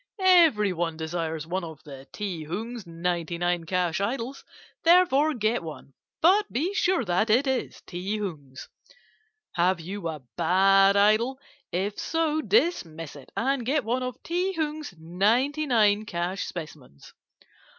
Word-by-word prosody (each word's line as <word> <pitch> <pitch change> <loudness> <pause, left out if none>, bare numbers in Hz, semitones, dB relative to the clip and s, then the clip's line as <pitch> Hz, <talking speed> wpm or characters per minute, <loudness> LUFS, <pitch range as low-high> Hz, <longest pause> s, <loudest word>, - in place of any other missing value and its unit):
Everyone 210 - +4
desires 160 -1 -3
one 185 +3 -3
of 160 -3 -9
the 140 -3 -11
Ti 185 -7 -5
Hung's 220 +5 -5
ninety 170 0 -2
nine 175 -1 -1
cash 180 0 0
idols, 245 +5 -3 0.4
therefore 315 -4 +4
get 220 -1 0
one; 155 -4 -9 0.3
but 400 +5 +4
be 330 +11 -1
sure 370 - +1
that 185 +5 +1
it 245 +6 +4
is 265 -2 -2
Ti 190 +4 -4
Hung's. 145 -10 -7 0.8
"Have 180 +1 +1
you 185 +2 -5
a 155 -4 -6
bad 195 +1 +4
idol? 220 +6 +3 0.3
If 195 +4 -2
so, 320 -1 0
dismiss 165 - 0
it, 140 -2 -13
and 265 +1 0
get 275 +4 0
one 245 +3 0
of 255 -1 -4
Ti 360 +3 -1
Hung's 310 - -3
ninety 225 - +1
nine 215 -4 +3
cash 175 0 -2
specimens. 150 - -9
200 Hz, 140 wpm, -26 LUFS, 170-270 Hz, 0.8 s, Everyone